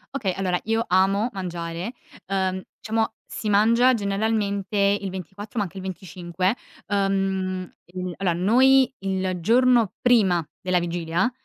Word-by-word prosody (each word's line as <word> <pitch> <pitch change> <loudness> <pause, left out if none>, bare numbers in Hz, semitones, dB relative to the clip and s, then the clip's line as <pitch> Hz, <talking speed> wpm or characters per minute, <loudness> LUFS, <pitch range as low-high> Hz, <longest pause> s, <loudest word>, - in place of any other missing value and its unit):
Okay, 195 -9 -1
allora 180 -2 -1
io 225 +1 0
amo 195 +5 +2
mangiare, 175 +2 -5 0.3
ehm, 190 -1 -1 0.2
diciamo 220 0 -1
si 215 - -4
mangia 230 +5 +5
generalmente 205 -1 -1
il 200 0 +2
24 190 +4 -8
ma - - +2
anche 190 +1 -10
il 190 - -6
25. 185 +1 -2 0.3
Ehm, 195 -2 -1 0.2
mhmm, 180 -1 -4
allora 185 -3 +1
noi 255 +9 +4
il 190 -1 -2
giorno 235 0 +4
prima 195 -10 +3 0.2
della 180 -1 +1
Vigilia, 175 +4 -1
195 Hz, 130 wpm, -24 LUFS, 185-215 Hz, 0.3 s, mangia